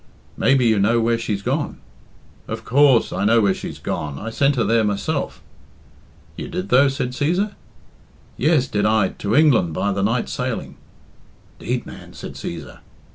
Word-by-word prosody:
"Maybe 135 -2 +3
you 110 -3 +3
know 115 +4 +3
where 115 0 +1
she's 105 -4 -3
gone." - - -2 0.7
"Of 110 0 -6
course 135 -1 +4
I - - -2
know 115 +3 +4
where's 100 -2 +2
she's - - -7
gone. 75 -2 -4
I 115 +9 -6
sent 140 +4 +2
her 120 - +1
there 115 +1 +2
myself!" 110 +9 -2 0.9
"You - - -6
did, 95 +2 -5
though?" 130 +4 +5
said 135 -2 -2
Cæsar. 180 +10 0 0.8
"Yes, 150 -1 +2
did 105 0 0
I 110 -3 +3
to 100 +2 -3
England 140 - +4
by 100 - 0
the 100 0 -1
night 115 +4 0
sailing." - - -4 0.8
"'Deed, - - -3
man!" - - -11
said - - -8
Cæsar. 80 -4 -7
115 Hz, 165 wpm, -21 LUFS, 100-135 Hz, 0.9 s, though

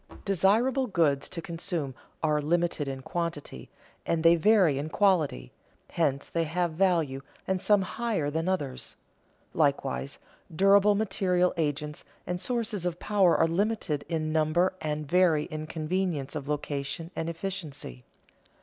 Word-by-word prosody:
Desirable 220 - +2
goods 155 - +1
to 170 - -6
consume 165 -4 -3 0.3
are 150 -1 +2
limited 165 -1 0
in 135 -1 -4
quantity, 165 - -4 0.3
and 160 -1 -1
they 165 0 +7
vary 175 -5 +4
in 150 +2 -4
quality; 160 - +1 0.4
hence 140 -4 0
they 165 - -1
have 170 +2 -1
value 160 -6 +1 0.2
and 190 -1 -1
some 205 -2 +4
higher 200 -8 -2
than 160 +4 -1
others. 145 -9 -3 0.6
Likewise, 140 -2 0 0.4
durable 200 +3 +5
material 185 -3 +1
agents 150 -1 -2 0.2
and 180 0 -3
sources 230 -6 -2
of 175 -1 -2
power 195 -4 +3
are - - +4
limited 180 -4 -1
in 155 -2 -1
number 160 +4 +2
and 150 -1 -3
vary 170 -2 +3
in 155 0 -5
convenience 160 -3 -2
of 145 -1 -5
location 145 +2 -3
and 165 0 -2
efficiency. 165 - -6
165 Hz, 135 wpm, -28 LUFS, 150-190 Hz, 0.6 s, they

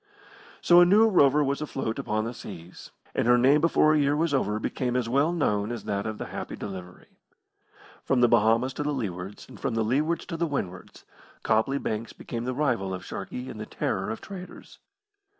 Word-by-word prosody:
So 175 0 +7
a - - +9
new 210 +5 +6
rover 150 -7 +4
was 140 +1 -1
afloat 135 -5 -3
upon 110 -5 -1
the 115 - -4
seas, 90 -6 -10 0.2
and - - 0
her 120 0 +6
name 135 +5 +4
before 155 -2 +4
a 155 - +3
year 145 0 +2
was 160 0 0
over 105 -6 +1
became 125 +2 -2
as 125 -2 0
well 140 +7 +2
known 105 -10 0
as 120 -3 -5
that 100 +1 -2
of 110 -1 -4
the - - -5
Happy - - -5
Delivery. 90 -3 -9 0.8
From 135 -3 +1
the 120 - +6
Bahamas 115 +4 +3
to 145 - -5
the 150 0 -1
Leewards, 95 -5 -5
and - - -13
from 115 - -2
the 115 - +1
Leewards 150 +8 0
to 165 - -5
the 170 0 0
Windwards, 95 - -5 0.4
Copley 110 +6 +2
Banks 115 -4 -4
became 120 0 -6
the 130 0 -2
rival 115 -10 0
of 90 - -9
Sharkey 125 +1 -6
and 110 - -8
the 110 - -6
terror 95 -2 -2
of 110 - -5
traders. 185 -2 -10
125 Hz, 205 wpm, -26 LUFS, 110-145 Hz, 0.8 s, a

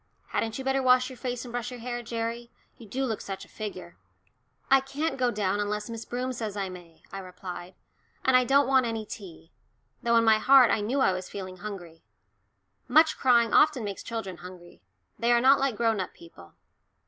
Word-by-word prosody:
Hadn't 225 -1 -2
you 265 - -5
better 270 0 +1
wash 255 0 +4
your 255 - -11
face 245 0 -4
and 240 - -8
brush 245 0 -3
your 250 -1 -8
hair, 240 +1 -4
Gerry 235 0 -4 0.3
you 230 - -14
do 265 +6 -2
look 225 -4 -3
such 195 -1 -6
a - - -21
figure." 90 - -8 0.7
"I 270 0 +5
can't 290 +4 -3
go 250 -2 +1
down 205 -3 -1
unless 210 +2 -2
Miss 230 0 -6
Broom 250 +1 -3
says 220 -4 -5
I 195 -1 -2
may," 175 -3 -13
I 195 - -6
replied, 180 -1 -9 0.5
"and 260 - +4
I 255 - +6
don't 275 +3 +3
want 260 -2 +3
any 225 -1 -3
tea," 180 -6 -10 0.5
though 235 0 +2
in 230 - +4
my 220 -1 +5
heart 265 0 +6
I 215 - +1
knew 250 +7 0
I 190 - +4
was 185 0 -5
feeling 185 -2 -7
hungry. 175 -5 -8 0.9
Much 315 0 +5
crying 235 -3 +3
often 295 -6 +4
makes 200 -2 -5
children 210 -6 -5
hungry; 180 -1 -12 0.4
they 235 +1 +2
are 240 - +5
not 270 +3 +5
like 270 -4 0
grown 225 -3 +1
up 185 - -5
people. 125 - -15
230 Hz, 205 wpm, -27 LUFS, 195-255 Hz, 0.9 s, I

